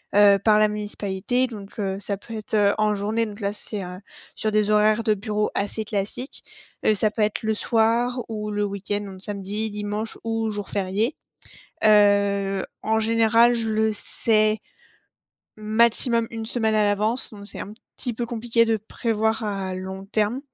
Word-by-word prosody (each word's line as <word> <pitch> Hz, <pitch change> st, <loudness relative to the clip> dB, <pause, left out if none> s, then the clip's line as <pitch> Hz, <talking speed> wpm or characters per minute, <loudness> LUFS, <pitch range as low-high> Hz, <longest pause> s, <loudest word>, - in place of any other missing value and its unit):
heu, 205 Hz, -1 st, +7 dB
par 215 Hz, -1 st, +5 dB
la 215 Hz, -, +5 dB
municipalité, 210 Hz, +3 st, -1 dB
donc, 210 Hz, -3 st, -10 dB
heu, 195 Hz, -2 st, -1 dB
ça 200 Hz, 0 st, -3 dB
peut 225 Hz, +3 st, -9 dB
être, 215 Hz, 0 st, -8 dB
heu, 205 Hz, -1 st, +4 dB
en 215 Hz, 0 st, +2 dB
journée, 215 Hz, +3 st, 0 dB
donc 210 Hz, -2 st, -9 dB
là, 200 Hz, -1 st, -1 dB
c'est, 210 Hz, -1 st, -4 dB
heu, 180 Hz, 0 st, -7 dB, 0.4 s
sur 215 Hz, -, -1 dB
des 210 Hz, 0 st, +2 dB
horaires 215 Hz, +1 st, +4 dB
de 215 Hz, -1 st, +2 dB
bureau 210 Hz, +1 st, -1 dB
assez 205 Hz, +2 st, -1 dB
classiques. 210 Hz, +5 st, -3 dB, 0.4 s
Heu, 215 Hz, -, +5 dB
ça 215 Hz, +1 st, +2 dB
peut 215 Hz, +1 st, -1 dB
être 210 Hz, 0 st, 0 dB
le 220 Hz, 0 st, 0 dB
soir 235 Hz, +3 st, +1 dB
ou 210 Hz, -1 st, -4 dB
le 205 Hz, 0 st, -1 dB
week-end, 205 Hz, 0 st, -2 dB
donc 195 Hz, -2 st, -9 dB
samedi, 205 Hz, +1 st, -2 dB
dimanche 210 Hz, +1 st, -4 dB
ou 225 Hz, -1 st, -1 dB
jours 205 Hz, -1 st, -3 dB
fériés. 205 Hz, +7 st, -1 dB, 0.7 s
Heu, 200 Hz, -2 st, +4 dB, 0.2 s
en 220 Hz, 0 st, +1 dB
général, 230 Hz, +1 st, +4 dB
je 230 Hz, -1 st, -1 dB
le 220 Hz, 0 st, +1 dB
sais 215 Hz, 0 st, +1 dB, 1.0 s
maximum 230 Hz, +2 st, +3 dB
1 225 Hz, -1 st, -5 dB
semaine 220 Hz, -1 st, 0 dB
à 215 Hz, -, +3 dB
l'avance, 210 Hz, +5 st, +1 dB
donc 200 Hz, -2 st, -10 dB
c'est 200 Hz, -, -6 dB
un 205 Hz, -, -6 dB, 0.2 s
petit 245 Hz, -2 st, 0 dB
peu 235 Hz, +2 st, -3 dB
compliqué 230 Hz, 0 st, +1 dB
de 225 Hz, -1 st, +1 dB
prévoir 220 Hz, +1 st, -1 dB
à 195 Hz, -3 st, -3 dB
long 190 Hz, +1 st, -6 dB
terme 215 Hz, +4 st, 0 dB
215 Hz, 175 wpm, -24 LUFS, 205-225 Hz, 1.0 s, heu